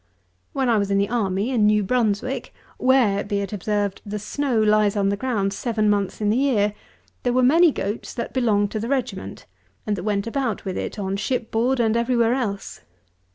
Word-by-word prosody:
When 265 Hz, -2 st, -1 dB
I 230 Hz, -3 st, +3 dB
was 200 Hz, -1 st, -1 dB
in 200 Hz, -, +2 dB
the 200 Hz, 0 st, +1 dB
army, 210 Hz, -1 st, 0 dB
in 220 Hz, -5 st, +3 dB
New 210 Hz, 0 st, +3 dB
Brunswick, 245 Hz, +3 st, -1 dB, 0.2 s
where, 250 Hz, -6 st, +3 dB
be 205 Hz, 0 st, -2 dB
it 200 Hz, +1 st, -5 dB
observed, 205 Hz, 0 st, -2 dB
the 210 Hz, 0 st, -5 dB
snow 240 Hz, +4 st, -1 dB
lies 215 Hz, -1 st, +3 dB
on 195 Hz, -1 st, +2 dB
the 200 Hz, -, +1 dB
ground 200 Hz, -4 st, -1 dB
seven 215 Hz, 0 st, 0 dB
months 200 Hz, -2 st, -1 dB
in 210 Hz, -1 st, +1 dB
the 225 Hz, -, +1 dB
year, 225 Hz, -7 st, +2 dB, 0.5 s
there 245 Hz, -, 0 dB
were 255 Hz, 0 st, +3 dB
many 325 Hz, +6 st, +6 dB
goats 210 Hz, -3 st, -4 dB
that 235 Hz, -2 st, -4 dB
belonged 210 Hz, -5 st, +1 dB
to 215 Hz, -, -2 dB
the 225 Hz, -, -3 dB
regiment, 215 Hz, -, -3 dB, 0.4 s
and 210 Hz, -, 0 dB
that 185 Hz, -, -5 dB
went 205 Hz, -1 st, -1 dB
about 230 Hz, -3 st, -2 dB
with 190 Hz, -1 st, -3 dB
it -, -, -4 dB
on 195 Hz, -1 st, -2 dB
shipboard 240 Hz, +3 st, 0 dB
and 225 Hz, -1 st, +2 dB
every 235 Hz, +2 st, +1 dB
where 230 Hz, 0 st, +3 dB
else. 215 Hz, -7 st, -3 dB
215 Hz, 200 wpm, -23 LUFS, 200-245 Hz, 0.5 s, many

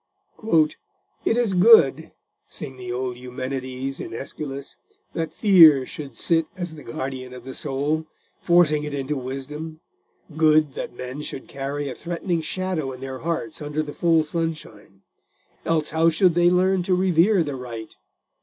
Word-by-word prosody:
"It 225 Hz, -, +2 dB
is 235 Hz, -5 st, +1 dB
good," 180 Hz, -, +6 dB, 0.4 s
sing 130 Hz, -, -7 dB
the 125 Hz, -1 st, -7 dB
old 125 Hz, 0 st, -3 dB
Eumenides, 130 Hz, +1 st, -5 dB
in -, -, -6 dB
Aeschylus, 140 Hz, +1 st, -7 dB, 0.4 s
"that 165 Hz, -1 st, -3 dB
fear 165 Hz, -, +7 dB
should 145 Hz, -7 st, -9 dB
sit 165 Hz, -2 st, +1 dB
as 175 Hz, -3 st, -4 dB
the 150 Hz, -, -11 dB
guardian 130 Hz, +1 st, -6 dB
of 125 Hz, -, -10 dB
the 130 Hz, +1 st, -8 dB
soul, 150 Hz, +4 st, -2 dB, 0.3 s
forcing 165 Hz, -4 st, +4 dB
it 150 Hz, -1 st, -4 dB
into 140 Hz, +2 st, -2 dB
wisdom—good 150 Hz, +2 st, -2 dB
that -, -, -6 dB
men 125 Hz, +4 st, -6 dB
should 140 Hz, -, -7 dB
carry 140 Hz, +1 st, -4 dB
a 130 Hz, -, -4 dB
threatening 170 Hz, +1 st, -3 dB
shadow 175 Hz, -4 st, -2 dB
in 130 Hz, -, -9 dB
their 130 Hz, 0 st, -6 dB
hearts 160 Hz, -1 st, -3 dB
under 150 Hz, +1 st, -2 dB
the 145 Hz, -1 st, -7 dB
full 165 Hz, -2 st, +3 dB
sunshine; 155 Hz, -, -5 dB, 0.6 s
else, 160 Hz, -2 st, 0 dB
how 160 Hz, +1 st, +4 dB
should 175 Hz, +2 st, +3 dB
they 175 Hz, +1 st, +4 dB
learn 185 Hz, +1 st, +3 dB
to 180 Hz, +1 st, +1 dB
revere 180 Hz, +1 st, +3 dB
the 145 Hz, -3 st, -4 dB
right?" 120 Hz, -4 st, -8 dB
150 Hz, 150 wpm, -23 LUFS, 130-165 Hz, 0.6 s, fear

